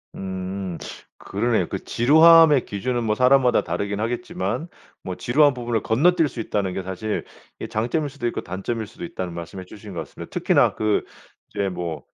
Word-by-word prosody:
음 95 Hz, -1 st, -5 dB, 0.4 s
그러네요. -, -, 0 dB
그 -, -, -5 dB
지루함의 160 Hz, +2 st, +6 dB
기준은 120 Hz, +4 st, -2 dB
뭐 105 Hz, -1 st, +1 dB
사람마다 125 Hz, 0 st, +4 dB
다르긴 100 Hz, +4 st, -3 dB
하겠지만 165 Hz, +8 st, -3 dB, 0.4 s
뭐 90 Hz, -, -4 dB
"지루한 145 Hz, +3 st, +3 dB
부분을 120 Hz, -3 st, -1 dB
건너뛸 160 Hz, +8 st, +3 dB
수 130 Hz, -, -8 dB
있다는 100 Hz, -4 st, -1 dB
게 95 Hz, -, -4 dB
사실 95 Hz, +3 st, -3 dB, 0.3 s
이 -, -, -5 dB
장점일 125 Hz, +7 st, -1 dB
수도 130 Hz, -4 st, -4 dB
있고 120 Hz, -, -3 dB
단점일 105 Hz, +5 st, -4 dB
수도 120 Hz, +12 st, -9 dB
있다."는 95 Hz, -, -5 dB
말씀해 85 Hz, +2 st, -7 dB
주신 105 Hz, 0 st, -11 dB
것 85 Hz, -, -4 dB
같습니다. 80 Hz, -, -10 dB
특히나 -, -, +2 dB
그 110 Hz, -1 st, +1 dB, 0.5 s
이제 100 Hz, -1 st, -2 dB
뭐 85 Hz, -3 st, -5 dB
110 Hz, 370 characters per minute, -23 LUFS, 95-135 Hz, 0.5 s, 지루함의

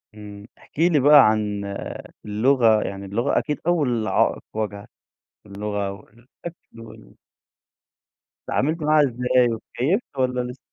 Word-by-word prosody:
إمم. 105 Hz, 0 st, -11 dB
احكِ -, -, -16 dB
لي 165 Hz, -2 st, +4 dB
بقى 145 Hz, +1 st, +7 dB
عن 105 Hz, -2 st, -2 dB, 0.6 s
اللغة، 110 Hz, +1 st, +3 dB
يعني 100 Hz, 0 st, -6 dB
اللغة 115 Hz, +8 st, -1 dB
أكيد 150 Hz, -1 st, -4 dB
أول 125 Hz, -10 st, +1 dB
عائق -, -, +1 dB
واجهك. 105 Hz, -2 st, -5 dB, 0.6 s
اللغة 100 Hz, 0 st, -4 dB
والأكل 120 Hz, -, -13 dB
وال 85 Hz, -, -14 dB, 1.3 s
اتعاملت 155 Hz, +5 st, 0 dB
معاها 150 Hz, 0 st, +4 dB
إزاي 125 Hz, 0 st, +1 dB
واتكيّفت 140 Hz, -, -3 dB
والَّا 125 Hz, -1 st, 0 dB
لسه؟ 125 Hz, -, -14 dB
120 Hz, 115 wpm, -22 LUFS, 105-140 Hz, 1.3 s, بقى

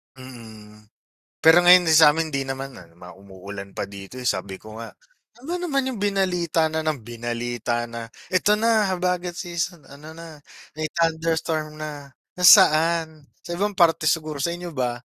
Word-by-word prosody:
Mm. 110 Hz, -5 st, -13 dB, 0.6 s
Pero, 160 Hz, +2 st, +7 dB
ngayon 180 Hz, -1 st, +7 dB
yung 160 Hz, -, +6 dB
sa'min 160 Hz, +1 st, +5 dB
'di 135 Hz, -2 st, -3 dB
naman, 135 Hz, 0 st, -5 dB
ah, 90 Hz, -, -14 dB
yung 85 Hz, +1 st, -25 dB
mga 90 Hz, 0 st, -11 dB
umuulan 100 Hz, +1 st, -10 dB
pa -, -, -4 dB
dito, 100 Hz, +3 st, -11 dB
eh, 125 Hz, -, -1 dB
sabi 95 Hz, -1 st, -3 dB
ko 110 Hz, +1 st, -11 dB
nga, 115 Hz, -, -9 dB, 0.5 s
"Ano 345 Hz, +5 st, -4 dB
naman 275 Hz, -7 st, -1 dB
yung 235 Hz, -, -6 dB
binalita 180 Hz, -5 st, 0 dB
na 160 Hz, 0 st, -3 dB
nang 150 Hz, -6 st, -2 dB
binalita 120 Hz, 0 st, -4 dB
na, 115 Hz, -1 st, -7 dB, 0.2 s
'Eto 185 Hz, +3 st, +3 dB
na, 220 Hz, -1 st, +2 dB
habagat 180 Hz, -1 st, -2 dB
season, 175 Hz, -1 st, -4 dB
ano 150 Hz, +3 st, -12 dB
na, 165 Hz, -2 st, -11 dB, 0.4 s
may 155 Hz, -, -1 dB
thunderstorm 160 Hz, -2 st, -1 dB
na.' 145 Hz, -3 st, -9 dB, 0.2 s
Nasaan? 165 Hz, -4 st, +5 dB, 0.2 s
Sa -, -, -7 dB
ibang 205 Hz, +1 st, -1 dB
parte 170 Hz, -3 st, +2 dB
siguro." 155 Hz, -1 st, 0 dB
sa 170 Hz, +5 st, -1 dB
inyo 175 Hz, 0 st, -7 dB
ba? 125 Hz, -4 st, -3 dB
155 Hz, 165 wpm, -23 LUFS, 120-175 Hz, 0.6 s, Pero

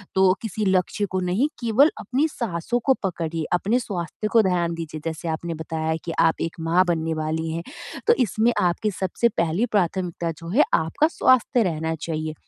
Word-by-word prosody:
तो 190 Hz, -, +4 dB, 0.2 s
किसी 220 Hz, -1 st, -3 dB
लक्ष्य 190 Hz, +2 st, +1 dB
को 185 Hz, -, 0 dB
नहीं 185 Hz, +11 st, +1 dB
केवल 235 Hz, +6 st, +5 dB
अपनी 275 Hz, +5 st, 0 dB
साँसों 235 Hz, -, -2 dB
को 265 Hz, -, +5 dB
पकड़िए। 165 Hz, -3 st, -2 dB
अपने 210 Hz, +7 st, +2 dB
स्वास्थ्य 190 Hz, -, -4 dB
को 225 Hz, -, +7 dB
ध्यान 175 Hz, -2 st, +1 dB
दीजिए 160 Hz, -2 st, -6 dB
जैसे 165 Hz, +1 st, -4 dB
आपने 165 Hz, +1 st, -3 dB
बताया 160 Hz, 0 st, -2 dB
कि 165 Hz, -, -3 dB
आप 160 Hz, -, +3 dB
एक 165 Hz, -, -2 dB
माँ 170 Hz, +3 st, +3 dB
बनने 165 Hz, -1 st, 0 dB
वाली 155 Hz, +1 st, -2 dB
हैं, 165 Hz, +1 st, -4 dB, 0.4 s
तो 470 Hz, -, +7 dB
इसमें 220 Hz, +3 st, +2 dB
आपकी 180 Hz, +4 st, +1 dB
सबसे 190 Hz, +6 st, 0 dB
पहली 170 Hz, +6 st, 0 dB
प्राथमिकता 175 Hz, -2 st, -1 dB
जो 165 Hz, 0 st, -8 dB
है 265 Hz, +11 st, +5 dB
आपका 310 Hz, -9 st, +2 dB
स्वास्थ्य 255 Hz, -5 st, +3 dB
रहना 160 Hz, -3 st, -1 dB
चाहिए। 155 Hz, -1 st, -3 dB
175 Hz, 180 wpm, -23 LUFS, 165-220 Hz, 0.4 s, को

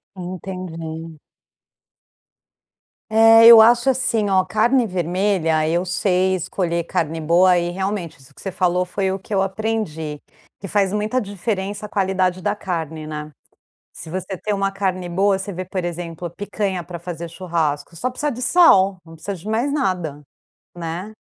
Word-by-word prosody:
Entendi. 165 Hz, -3 st, -7 dB, 1.9 s
É, 225 Hz, +1 st, +7 dB
eu 230 Hz, -1 st, +11 dB
acho 240 Hz, +3 st, +5 dB
assim, 240 Hz, -5 st, +1 dB
ó: 190 Hz, -1 st, +4 dB
carne 235 Hz, +2 st, +2 dB
vermelha, 175 Hz, -3 st, 0 dB
eu 170 Hz, +2 st, +1 dB
sei 185 Hz, +1 st, +1 dB
escolher 170 Hz, -1 st, -2 dB
carne 165 Hz, -1 st, -2 dB
boa 175 Hz, +3 st, +4 dB
e, 175 Hz, 0 st, -1 dB
realmente, 190 Hz, -1 st, -3 dB
isso 135 Hz, -2 st, -17 dB
que -, -, -14 dB
você 195 Hz, -, -5 dB
falou 180 Hz, 0 st, +1 dB
foi 190 Hz, +1 st, -1 dB
o 195 Hz, -, -3 dB
que 200 Hz, +2 st, -5 dB
eu 190 Hz, -, +3 dB
aprendi: 195 Hz, -7 st, -3 dB, 0.4 s
que -, -, -7 dB
faz 195 Hz, 0 st, +1 dB
muita 215 Hz, +4 st, 0 dB
diferença 205 Hz, 0 st, -4 dB
a -, -, -23 dB
qualidade 185 Hz, -2 st, 0 dB
da 205 Hz, +3 st, 0 dB
carne, 160 Hz, -6 st, -4 dB
né. 150 Hz, 0 st, -6 dB, 0.6 s
Se 160 Hz, -, -10 dB
você 185 Hz, +1 st, -4 dB
tem 210 Hz, -, -3 dB
uma 195 Hz, -1 st, 0 dB
carne 190 Hz, -2 st, -2 dB
boa 195 Hz, +3 st, +2 dB
você 195 Hz, +1 st, -5 dB
vê, 185 Hz, -1 st, -5 dB
por 185 Hz, 0 st, -4 dB
exemplo, 175 Hz, 0 st, -5 dB
picanha 190 Hz, 0 st, -3 dB
pra 175 Hz, -1 st, -7 dB
fazer 170 Hz, -1 st, -7 dB
churrasco, 165 Hz, -3 st, -2 dB
só 255 Hz, +10 st, -2 dB
precisa 295 Hz, +4 st, -2 dB
de 250 Hz, -1 st, -6 dB
sal. 195 Hz, -, +5 dB
Não 165 Hz, -1 st, -14 dB
precisa 195 Hz, +5 st, -5 dB
de 185 Hz, +4 st, -9 dB
mais 240 Hz, +6 st, 0 dB
nada, 180 Hz, -, -1 dB, 0.6 s
né. 175 Hz, +5 st, -5 dB
185 Hz, 160 wpm, -21 LUFS, 170-205 Hz, 1.9 s, eu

